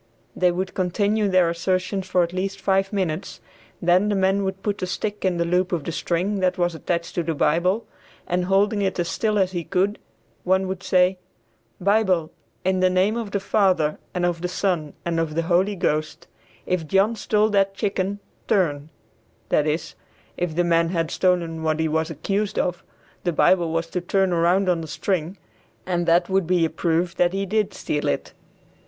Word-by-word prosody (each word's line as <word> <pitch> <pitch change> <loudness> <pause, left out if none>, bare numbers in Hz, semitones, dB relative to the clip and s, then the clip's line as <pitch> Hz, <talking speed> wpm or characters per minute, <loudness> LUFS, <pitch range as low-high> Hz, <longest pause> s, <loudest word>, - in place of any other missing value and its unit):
They 180 -1 +3
would 185 +2 -3
continue 200 +3 +1
their 185 -2 +4
assertions 185 +2 -1
for 180 -1 +3
at 170 +1 -4
least 190 +2 -3
five 195 0 +1
minutes, 185 -7 -3 0.4
then 180 +4 +3
the 205 - +1
man 195 +1 +2
would 190 0 -4
put 205 -1 -2
a 185 - -1
stick 205 +3 -3
in 185 -2 +1
the 170 - +1
loop 180 +1 +1
of 170 -5 -1
the 165 - -4
string 180 +5 -1
that 185 -1 +1
was 175 -1 +1
attached 170 +1 -3
to 175 - 0
the 165 -1 -2
Bible, 180 +9 +1 0.4
and 180 0 0
holding 200 +2 +2
it 195 -1 -1
as 175 -1 0
still 215 +4 0
as 190 -2 +2
he 175 -2 -3
could, 195 +4 0 0.4
one 190 +1 +2
would 190 0 -4
say, 185 0 +2 0.6
"Bible, 190 -4 +2 0.3
in 190 0 +2
the 185 0 +4
name 185 +4 +2
of 230 -3 -3
the 200 - -1
Father 190 -6 +1
and 180 -1 -1
of 175 -1 -1
the 180 - -1
Son 175 -5 -1
and 170 -1 0
of 160 -2 -2
the 165 - +1
Holy 185 +4 +2
Ghost, 155 -3 -2 0.4
if 180 -4 -1
John 195 +6 +2
stole 215 0 +1
that 195 -1 +2
chicken, 200 -1 -1 0.3
turn," 155 -7 +1 0.6
that 150 - +2
is, 155 +2 -2 0.4
if 175 -3 -2
the 175 - +2
man 170 -1 +2
had 165 -2 -1
stolen 170 -3 0
what 155 0 0
he 160 - +1
was 160 +1 0
accused 195 +7 -2
of, 180 -1 -1 0.4
the 175 - +1
Bible 170 +1 +3
was 165 0 0
to 180 - -2
turn 190 +1 +1
around 175 +3 +2
on 175 -2 +2
the 160 - -6
string, 175 +3 -2 0.5
and 175 -1 -1
that 170 +1 +4
would 190 -3 +1
be 175 -2 +3
a 160 - -2
proof 170 +2 0
that 175 0 +2
he 195 0 -1
did 210 +1 0
steal 150 - -2
it. 70 - -2
180 Hz, 195 wpm, -23 LUFS, 170-195 Hz, 0.6 s, their